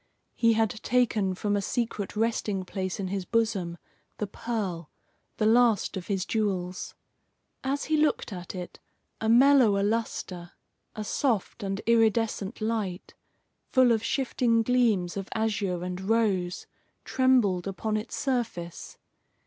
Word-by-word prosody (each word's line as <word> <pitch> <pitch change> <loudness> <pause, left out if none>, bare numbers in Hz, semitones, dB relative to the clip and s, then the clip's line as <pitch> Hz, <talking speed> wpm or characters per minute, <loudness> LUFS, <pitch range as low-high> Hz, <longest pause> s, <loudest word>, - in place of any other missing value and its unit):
He 230 -1 +3
had 220 -1 +2
taken 220 -6 +1
from 205 +2 -1
a 200 - +1
secret 215 -2 -2
resting 210 -3 -1
place 185 +1 -4
in 190 -2 -2
his 195 0 -2
bosom 195 -5 0 0.4
the 210 - -1
pearl, 200 -6 -4 0.5
the 215 - +1
last 230 -1 +3
of 185 -2 -6
his 195 -3 -1
jewels. 185 -5 -2 0.7
As 275 +2 -1
he 310 0 +1
looked 300 -7 +1
at 180 0 -7
it, 180 -1 -7 0.4
a 220 - -1
mellower 240 -5 +6
lustre, 200 -5 -2 0.4
a 215 - -4
soft 230 -1 -1
and 195 0 -3
iridescent 225 -2 +1
light, 215 -5 -2 0.5
full 255 -2 +4
of 225 -1 +1
shifting 235 -3 +1
gleams 220 -7 +2
of 195 -1 -5
azure 205 -5 -1
and 180 +1 -4
rose, 195 -4 0 0.4
trembled 235 -9 +2
upon 215 +3 -2
its 215 +1 -3
surface. 230 - -3
215 Hz, 135 wpm, -27 LUFS, 190-230 Hz, 0.7 s, mellower